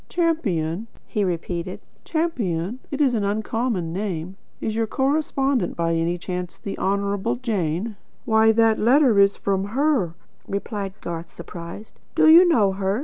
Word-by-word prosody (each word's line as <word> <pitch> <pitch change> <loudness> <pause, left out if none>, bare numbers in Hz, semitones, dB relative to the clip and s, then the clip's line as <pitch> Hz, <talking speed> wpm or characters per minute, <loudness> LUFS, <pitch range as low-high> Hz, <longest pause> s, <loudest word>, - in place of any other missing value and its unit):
"Champion?" 220 - 0 0.2
he 210 - -1
repeated. 175 0 -3 0.3
"Champion? 235 - -1
It's 275 -2 +2
an 220 -3 0
uncommon 210 -3 -1
name. 185 -2 -3 0.2
Is 220 - -2
your 225 0 0
correspondent, 270 - 0
by 165 0 +1
any 165 +1 0
chance, 180 0 -5
the 200 - -5
Honourable 200 0 0
Jane?" 210 -3 -2 0.3
"Why, 220 -2 +5
that 225 0 +3
letter 245 -1 +5
is 200 0 +5
from 195 -1 0
her," 270 - +2 0.3
replied 200 -1 -4
Garth, 170 0 -6
surprised. 170 +4 -9 0.2
"Do - - +5
you 340 +3 +9
know 215 - +4
her?" 195 +2 -1
200 Hz, 140 wpm, -23 LUFS, 180-240 Hz, 0.3 s, you